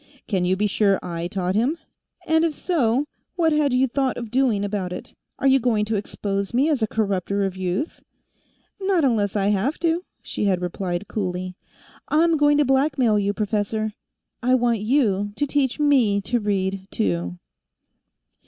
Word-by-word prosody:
"Can 190 -4 0
you 185 +1 +2
be 210 - +1
sure 200 -1 +2
I 170 -1 -4
taught 180 0 -2
him? 245 - +1 0.5
And 320 0 +3
if 325 -3 0
so, 275 -7 +1 0.3
what 325 -3 +2
had 300 -2 +2
you 255 +1 +3
thought 265 0 -1
of 235 -3 -6
doing 240 -6 +2
about 200 -3 -3
it? 180 - -7 0.2
Are - - -4
you 270 0 +5
going 225 -4 +1
to 220 +1 -1
expose 200 +1 -3
me 275 +5 +3
as 290 -6 +1
a 220 - +2
corrupter 200 -2 -1
of 190 -1 -3
youth?" 185 - -3 0.8
"Not 380 -4 +2
unless 215 -7 +1
I 200 -1 +2
have 210 +9 0
to," 335 +1 +1 0.2
she - - -3
had 190 -3 +2
replied 180 +1 -3
coolly. 185 -3 -3 0.5
"I'm 330 +2 +3
going 290 0 +4
to 295 - +3
blackmail 265 -5 +2
you, 200 0 +1
professor. 215 +1 -1 0.5
I 255 +1 +3
want 240 -3 +2
you 205 -4 +1
to 290 - 0
teach 280 -1 0
me 260 -9 +3
to 240 +5 0
read, 195 -2 -1
too." 90 -2 -1
215 Hz, 170 wpm, -23 LUFS, 195-270 Hz, 0.8 s, you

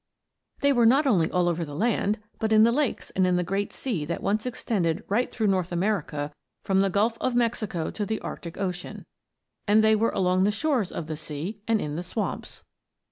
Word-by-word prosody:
They 280 0 +4
were 240 -3 +5
not 275 +6 +4
only 185 -12 +3
all 180 -1 +1
over 170 -1 0
the 145 -2 -7
land, 215 +2 +1 0.2
but 220 0 -1
in 215 0 +7
the 230 - +5
lakes 280 +1 -1
and 185 -1 +2
in 180 - +2
the 180 - +1
great 195 +3 -2
sea 220 - -3
that 170 - -4
once 215 +4 0
extended 200 -7 -1
right 230 +5 0
through 220 - -1
North 185 -3 +1
America 170 -6 -1 0.3
from 195 -1 +2
the 195 - +2
Gulf 220 +5 +1
of 255 -1 0
Mexico 220 -8 0
to 210 - -3
the 215 +2 -2
Arctic 170 -1 -7
Ocean. 180 -2 -4 0.6
And 215 +2 +5
they 220 0 +5
were 225 +2 +2
along 185 0 +2
the 205 - +3
shores 245 - 0
of 165 - -4
the 155 -1 -5
sea 160 +7 -6
and 225 -1 +3
in 150 -3 -3
the - - -2
swamps. 180 +5 -4
200 Hz, 210 wpm, -26 LUFS, 175-225 Hz, 0.6 s, in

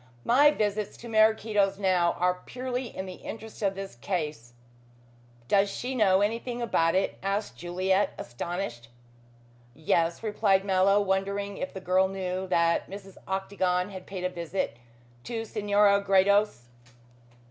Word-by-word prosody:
My 280 +5 +6
visits 210 -6 -1
to 235 - -10
Maraquito's 215 -3 +3
now 185 -3 +2
are 180 0 0
purely 250 0 -4
in 190 - -6
the 185 -1 -8
interests 225 0 -8
of 195 -2 0
this 195 0 -6
case." 150 - -4 0.9
"Does 200 +6 +3
she 250 +5 -4
know 200 -6 +4
anything 230 +3 -1
about 165 -8 +1
it?" 190 - 0
asked 200 +2 -2
Juliet, 185 +3 0
astonished. 120 -3 -5 0.9
"Yes," 165 +3 0
replied 200 -3 +2
Mallow, 195 +1 +4
wondering 200 +1 -1
if 275 - -4
the 190 - -8
girl 185 +1 +3
knew 190 -1 -3
that 170 -2 +1
Mrs. 195 -1 -10
Octagon 190 -1 -1
had 185 -1 -9
paid 190 -2 -6
a 180 - +1
visit 175 -4 -3 0.5
to 225 -2 -4
Senora 205 -2 +3
Gredos. 200 - +3
195 Hz, 135 wpm, -27 LUFS, 180-210 Hz, 0.9 s, My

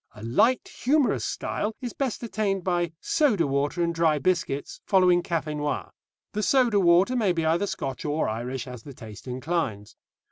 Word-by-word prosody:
A 105 - -11
light 225 - +2
humorous 270 -3 +1
style 215 +1 -3
is 245 -3 -5
best 260 -4 -3
attained 205 -4 -1
by 175 -2 0
soda 260 - +2
water 145 +5 0
and 170 0 0
dry 165 -2 +2
biscuits, 165 -4 -1
following 180 -2 +4
café 160 -3 -2
noir. 145 -1 -3 0.4
The 210 - -1
soda 235 0 +3
water 180 +6 +4
may 210 -7 +2
be 165 -2 -1
either 170 +5 +2
Scotch 135 -8 -4
or 150 +1 0
Irish 120 +4 -3
as 125 -3 -8
the 140 +2 -11
taste 110 +1 -11
inclines. 125 -6 -3
170 Hz, 170 wpm, -26 LUFS, 140-205 Hz, 0.4 s, following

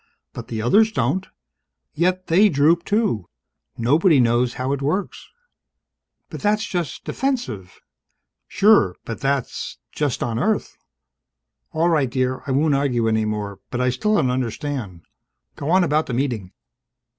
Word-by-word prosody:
But 115 - -8
the 110 -3 -4
others 215 - +4
don't, 145 - -1 0.7
yet 185 +2 0
they 195 +6 +4
droop, 160 +2 +3
too. 205 - 0 0.5
Nobody 150 - +3
knows 120 0 +2
how 130 +2 -2
it 140 - -3
works 170 +8 -3 0.5
..." - - -59
"But - - -7
that's 215 +1 +1
just 175 - -4
defensive!" 130 - -3 0.7
"Sure. 200 - +4
But 115 - -6
that's 135 -2 -2
just 145 -5 -1
on 115 -1 -2
Earth!" 215 - -1 1.0
"All 165 +1 +1
right, 150 -6 +2
dear. 130 +1 -1
I - - -1
won't 145 +3 +2
argue 130 -5 +1
any 110 -1 +1
more. 105 -2 -4
But 125 - -3
I 125 0 +2
still 210 - 0
don't 130 -10 +2
understand. 125 - -4 0.5
Go 145 - -5
on 185 +2 +4
about 155 -1 +1
the 125 - -3
Meeting." 120 -8 -2
140 Hz, 145 wpm, -22 LUFS, 120-175 Hz, 1.0 s, others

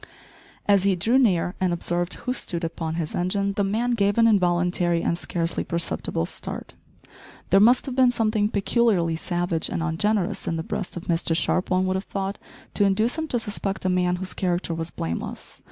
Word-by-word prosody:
As 200 -2 +4
he 195 -1 +3
drew 225 +9 +3
near 180 -8 +2
and 185 -1 +2
observed 175 +1 0
who 250 - -3
stood 175 -8 -1
upon 165 -1 -3
his 165 -2 -3
engine, 195 +3 0
the 200 - 0
man 225 +5 0
gave 205 -3 +1
an 230 - +5
involuntary 175 -4 +2
and - - +1
scarcely 170 -1 -2
perceptible 170 - -2
start. - - -7 0.8
There 195 - +6
must 240 +5 +5
have 265 -3 -4
been 260 -1 +5
something 215 -3 +1
peculiarly 200 -6 +2
savage 175 0 -1
and 165 - -2
ungenerous 195 +4 0
in 165 - 0
the 160 - -3
breast 180 +1 -4
of 175 - -6
Mr 165 -1 0
Sharp, 180 +2 0
one 185 0 +2
would 185 0 0
have 190 - -3
thought, 195 +1 -4 0.3
to 205 - +3
induce 215 +4 +2
him 320 - -2
to 250 - 0
suspect 200 -4 -3
a - - +3
man 180 -1 +2
whose 185 +1 -5
character 175 -2 -1
was 165 0 -4
blameless. 80 - -5
185 Hz, 190 wpm, -24 LUFS, 175-210 Hz, 0.8 s, There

